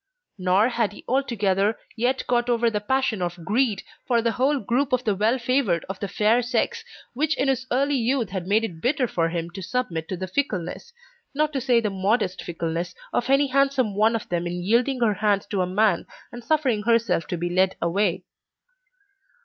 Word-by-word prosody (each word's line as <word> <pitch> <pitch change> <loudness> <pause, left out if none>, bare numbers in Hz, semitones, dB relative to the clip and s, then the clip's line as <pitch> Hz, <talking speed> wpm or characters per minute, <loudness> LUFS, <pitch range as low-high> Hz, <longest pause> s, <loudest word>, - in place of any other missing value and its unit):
Nor 185 +5 +3
had 230 -4 0
he - - -13
altogether 215 -6 +1 0.2
yet 250 +3 0
got 240 0 +1
over 235 -1 +2
the 210 -1 -2
passion 260 -2 0
of 175 -1 -4
greed 225 -2 +1 0.2
for 240 -2 +3
the 230 0 +1
whole 270 +5 +1
group 255 +5 0
of 250 0 +2
the 215 - +1
well 215 +6 +1
favoured 240 -8 0
of 190 0 -6
the 200 - -3
fair 215 +5 +2
sex, 245 +1 -1 0.3
which 305 +5 0
in 275 - +1
his 260 -1 0
early 275 +3 +1
youth 240 -3 0
had 185 -2 -4
made 215 +3 +3
it 170 -7 -5
bitter 260 0 +1
for 165 -6 0
him 170 0 -4
to 195 +2 -8
submit 175 -7 -3
to 185 - -3
the 185 - -3
fickleness, 185 - -3 0.4
not 305 +1 +1
to 270 - -1
say 245 -2 +3
the 215 -3 -1
modest 195 0 0
fickleness, 170 +1 -4 0.2
of 240 - 0
any 275 +1 +4
handsome 270 -4 +1
one 220 +3 +3
of 225 - -4
them 175 0 -1
in 175 0 -4
yielding 245 +6 +1
her 220 -3 +3
hand 205 -1 +1
to 200 -3 0
a 180 - 0
man 195 -1 +1 0.2
and 240 0 -9
suffering 265 -6 +1
herself 225 -6 +1
to 175 - -3
be 175 +1 -2
led 185 +1 +2
away. 180 +1 0
220 Hz, 200 wpm, -24 LUFS, 185-250 Hz, 0.4 s, any